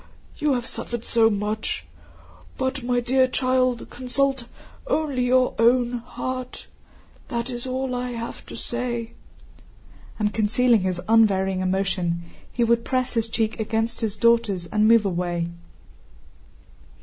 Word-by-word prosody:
You 295 -2 +2
have 240 -2 -2
suffered 240 0 -4
so 225 -1 +4
much.... 210 - -2 0.7
But, 260 +1 -1
my 245 0 +1
dear 260 +2 +3
child, 255 -1 +1
consult 260 0 0 0.4
only 300 - 0
your 255 0 +3
own 240 +1 +3
heart. 255 +1 -6 0.6
That 235 -1 -3
is 240 +1 -5
all 260 0 -2
I 250 0 -3
have 230 0 -6
to - - -8
say," 240 -1 -3 1.1
and 210 -1 0
concealing 225 +1 +3
his 185 -1 -1
unvarying 195 -4 +3
emotion 185 -2 0 0.3
he 240 - 0
would 235 0 +2
press 255 0 -1
his 225 -1 0
cheek 220 0 -1
against 225 +2 -1
his 215 -2 -2
daughter's 230 -6 +2
and 215 +3 +2
move 230 -2 +5
away. 175 -2 -1
235 Hz, 130 wpm, -24 LUFS, 215-250 Hz, 1.1 s, move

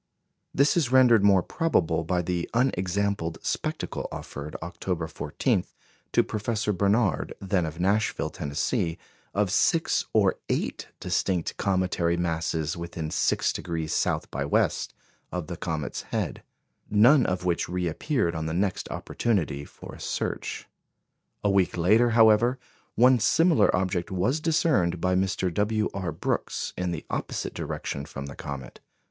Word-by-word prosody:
This 140 +2 +3
is 150 -8 +1
rendered 125 -5 +6
more 100 -3 +5
probable 80 - +1
by 90 +2 0
the 85 0 -2
unexampled 100 -7 0
spectacle - - -3
offered, 75 +2 -7
October 85 0 -3
14, - - -1 0.5
to - - +5
Professor 110 0 -1
Barnard, 100 +1 +1
then 95 -4 0
of 80 +2 -7
Nashville, 100 +4 +1
Tennessee, 80 - -1 0.4
of 100 -2 +1
six 165 - +2
or 100 -4 +3
eight - - -2
distinct 90 -3 -1
cometary 90 -3 +1
masses 80 -2 -1
within 85 -2 -5
6° 80 0 0
south - - 0
by 70 - -2
west 70 - 0 0.4
of 90 -3 -3
the 85 - -6
comet's 80 -3 -3
head, - - -3 0.5
none 120 +7 +6
of 90 0 -2
which 85 -2 0
reappeared 90 - -1
on 80 -1 -3
the 80 - -2
next 95 +1 -1
opportunity 85 -11 -1
for - - -12
a - - -11
search. - - -3 0.8
A 105 - +3
week 95 -3 +2
later, 110 +8 +4
however, 115 +2 +5 0.4
one 125 +2 +6
similar 165 - +4
object 90 -1 -1
was 100 - 0
discerned 155 - +2
by 90 +2 +1
Mr. 95 -1 0
W. 105 +3 0
R. 95 -4 -3
Brooks, 80 - -2
in 90 0 -2
the 85 -3 -4
opposite - - -3
direction 70 - -4
from 70 -2 -7
the 70 - -8
comet. 70 -2 -7
90 Hz, 140 wpm, -26 LUFS, 85-110 Hz, 0.8 s, rendered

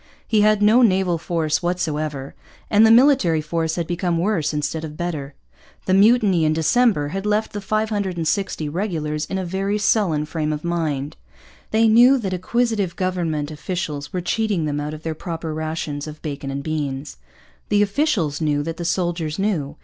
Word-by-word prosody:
He 215 -2 +3
had 210 0 +3
no 220 +4 +6
naval 190 -6 +2
force 160 -2 -1
whatever; 155 -5 -2 0.4
and 215 +1 +6
the - - +4
military 235 - +5
force 160 +1 -2
had 170 - -2
become 175 0 -1
worse 170 -4 0
instead 155 +1 -2
of 155 -1 -7
better. 155 -5 -4 0.5
The 185 - +1
mutiny 200 -3 +4
in 155 0 +2
December 160 0 +2
had 195 +5 -4
left 210 +1 0
the 205 - -4
560 195 -6 -1
regulars 155 -3 -2
in 190 - -4
a 190 - -3
very 195 +3 -1
sullen 200 -8 +1
frame 155 -1 -2
of 150 0 -4
mind. 155 -5 -2 0.5
They 225 +1 +3
knew 240 +5 +6
that 195 -7 -3
acquisitive 205 -1 -1
government 165 -5 -2
officials 150 -2 -4
were 180 - -2
cheating 200 -2 0
them 145 -1 -2
out 150 +1 -4
of 155 - -12
their 160 - -2
proper 165 -1 -5
rations 155 -2 -4
of 155 0 -9
bacon 140 -2 -5
and 140 +1 -4
beans. 145 -2 -4 0.5
The 205 0 +4
officials 200 - 0
knew 145 -2 +1
that 165 +1 -5
the 170 - -5
soldiers 170 -3 -1
knew. 165 -8 -1
170 Hz, 170 wpm, -21 LUFS, 155-205 Hz, 0.5 s, no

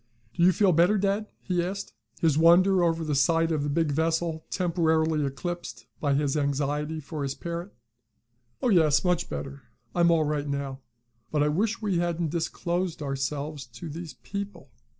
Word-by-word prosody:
Do - - -3
you 180 +2 +7
feel 190 +2 +3
better, 175 +6 +4
dad?" 200 +2 0 0.2
he 180 -2 0
asked, 195 +3 -5 0.3
his 160 -4 +3
wonder 175 +4 +5
over 165 -1 +1
the 155 -2 -1
sight 165 +4 +3
of 155 -2 0
the 145 - -1
big 155 +1 +1
vessel 160 +1 -1
temporarily 160 -4 +1
eclipsed 175 +6 -5 0.2
in 145 -2 +2
his 145 -1 0
anxiety 145 +2 -1
for 155 +1 -6
his 140 -1 -2
parent. 170 +3 -5 0.9
"Oh, 250 - +3
yes, 160 -5 +4
much 180 -2 +1
better. 140 0 -6 0.3
I'm 170 -1 +4
all 165 -2 +4
right 150 -1 -1
now. 140 -1 -3 0.5
But 150 -1 +2
I 150 - +2
wish 215 +8 0
we 195 -5 +1
hadn't 170 -2 -1
disclosed 170 0 -2
ourselves 140 0 -3
to 120 +7 -9
these 165 +1 -7
people. 200 -9 -7
165 Hz, 170 wpm, -27 LUFS, 145-175 Hz, 0.9 s, you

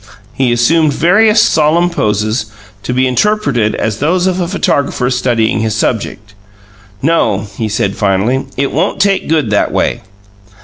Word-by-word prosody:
He 130 -2 0
assumed 145 +6 +2
various 210 +8 +3
solemn 170 -4 +2
poses, 110 - -1 0.3
to 125 - -4
be 130 +1 +1
interpreted 130 - 0
as 110 -3 -3
those 175 +5 +1
of 185 -1 0
a 175 - -1
photographer 140 -8 -1
studying 120 -4 0
his 110 -1 -1
subject. 105 -2 -3 0.7
"No," 115 -11 +1
he 110 -2 -3
said 100 -2 -1
finally; 105 +6 0
"it 140 +1 -1
won't - - -1
take 195 -4 +1
good 155 -9 0
that 105 - +1
way." - - -1
130 Hz, 145 wpm, -13 LUFS, 110-165 Hz, 0.7 s, various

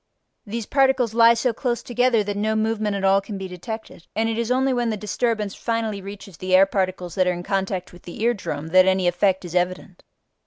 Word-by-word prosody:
These 225 +1 -4
particles 265 -4 +2
lie 230 0 +6
so 235 +1 0
close 240 0 -2
together 245 -2 +2
that 205 0 -3
no 215 +2 0
movement 215 -1 0
at 195 - -3
all 195 0 +4
can 200 0 -7
be 190 0 -5
detected, 185 0 -8
and 225 +1 +1
it 225 - -1
is 235 0 -1
only 260 +1 +2
when 240 -2 0
the 215 - -2
disturbance 210 0 -1
finally 225 -3 -2
reaches 200 -2 -10
the 185 +2 +1
air 190 +1 +7
particles 185 -2 -2
that 185 -2 +1
are 180 - +2
in 175 0 -6
contact 190 -1 -2
with 175 - -14
the 175 - -10
ear 240 +1 +3
drum 155 -7 -5
that 185 +2 +5
any 190 -1 +2
effect 185 +1 +1
is 175 - -8
evident. 180 0 -2
205 Hz, 225 wpm, -23 LUFS, 185-230 Hz, -, air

